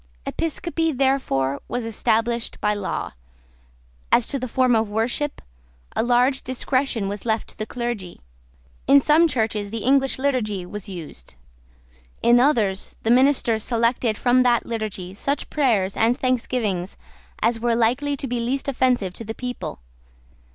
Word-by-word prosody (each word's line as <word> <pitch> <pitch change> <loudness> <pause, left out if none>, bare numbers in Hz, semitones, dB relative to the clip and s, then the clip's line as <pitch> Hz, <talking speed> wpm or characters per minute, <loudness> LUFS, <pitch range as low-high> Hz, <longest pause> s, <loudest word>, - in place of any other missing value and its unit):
Episcopacy, 330 0 -1
therefore, 255 - 0
was 245 -1 -3
established 230 +1 0
by 210 - +1
law. 205 -2 -3 1.0
As 240 - +4
to 275 - 0
the 255 - -3
form 255 0 +2
of 220 -1 +1
worship, 235 +7 -1 0.5
a - - +2
large 245 +3 +2
discretion 255 -4 -1
was 200 0 -5
left 220 -1 -1
to - - -14
the 215 - -3
clergy. 235 -7 -4 0.7
In 280 +1 +7
some 310 +4 +4
churches 220 -7 -1
the 225 0 -5
English 270 +1 +3
Liturgy 235 -9 -1
was 210 +2 -8
used. 155 - -9 0.9
In 240 +1 +6
others, 220 -8 +1
the 225 - +2
ministers 250 -3 +3
selected 230 -1 +1
from 250 0 +3
that 240 -2 +3
Liturgy 215 -5 -4
such 280 +8 -3
prayers 220 -10 +1
and 235 +3 +2
thanksgivings 230 -8 -1 0.4
as 230 +1 +1
were 235 0 +1
likely 255 +5 +1
to 270 - -4
be 245 -2 -2
least 265 +4 -2
offensive 250 -8 +1
to 230 - -6
the 220 +1 -6
people. 250 - -6
235 Hz, 145 wpm, -23 LUFS, 215-260 Hz, 1.0 s, In